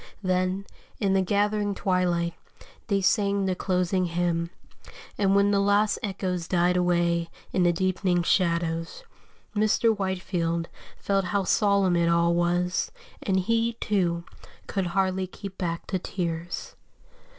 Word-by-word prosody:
Then, 185 +1 0 0.3
in 195 -2 +1
the 195 - +3
gathering 205 +1 +1
twilight, 175 -3 0 0.5
they 200 -3 +1
sang 200 0 +2
the 190 - +1
closing 185 0 0
hymn, 170 -1 -1 0.7
and 195 -1 +2
when 200 0 +4
the 200 - +3
last 205 +1 +2
echoes 185 -4 -3
died 180 0 +2
away 170 -1 +1 0.2
in 185 - +2
the 175 -1 +4
deepening 185 0 0
shadows, 170 -2 0 0.5
Mr. 215 +2 +3
Whitefield 180 -4 -2 0.3
felt 195 -1 0
how 200 +1 0
solemn 200 -2 +3
it 170 0 +2
all 170 0 +3
was, 175 +1 0 0.3
and 190 -1 +1
he, 230 +4 +1
too, 180 -6 0 0.4
could 195 -3 -2
hardly 185 +1 0
keep 195 +1 -9
back 170 -2 -2
the 190 - -2
tears. 170 -2 -4
185 Hz, 130 wpm, -26 LUFS, 175-200 Hz, 0.7 s, when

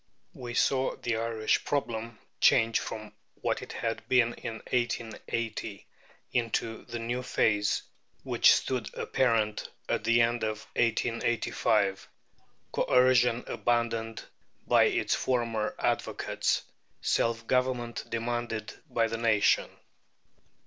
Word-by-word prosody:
We 120 -1 -7
saw 130 +1 +2
the 120 -2 -2
Irish 115 -1 0
problem 115 -5 -2 0.2
change 115 0 +4
from 110 -1 -6 0.2
what - - -2
it - - -8
had 115 -1 -2
been 120 -2 +4
in 115 - -6 0.2
1880 115 -3 -2 0.5
into 115 -1 -1
the 120 -1 -5
new 120 +2 -2
phase 105 -4 +1 0.4
which - - +5
stood 125 -6 -2
apparent 110 -4 0 0.2
at - - 0
the 115 +2 +4
end 120 +1 +2
of 110 0 -2
1885, 115 -3 +1 0.6
Coercion 125 -1 +3
abandoned 115 0 -1 0.4
by - - +5
its - - +1
former 115 -4 0
advocates, - - 0 0.4
Self 115 0 +1
government 125 -1 0
demanded 115 -1 -3 0.2
by 115 - +2
the 115 0 -2
nation. 115 -3 +3
115 Hz, 105 wpm, -29 LUFS, 110-120 Hz, 0.6 s, which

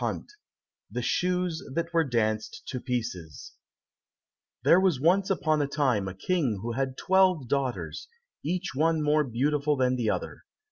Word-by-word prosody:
133 420 - -4 0.5
The - - -3
Shoes 180 -2 0
That 170 0 -2
Were 165 -1 +4
Danced 110 -5 -1
to 130 - -3
Pieces 110 - -5 1.1
There 175 - +6
was 185 -8 +2
once 185 +6 +3
upon 155 -5 +1
a 145 - 0
time 130 -9 +1
a 95 - -6
King 135 - 0
who 120 - -2
had 130 +2 -2
twelve 185 -7 +3
daughters, 135 -1 -2 0.4
each 180 +4 -2
one 160 +2 +2
more 150 +1 +3
beautiful 145 +4 0
than 130 0 +2
the 115 -3 0
other. - - -4
145 Hz, 150 wpm, -27 LUFS, 125-170 Hz, 1.1 s, There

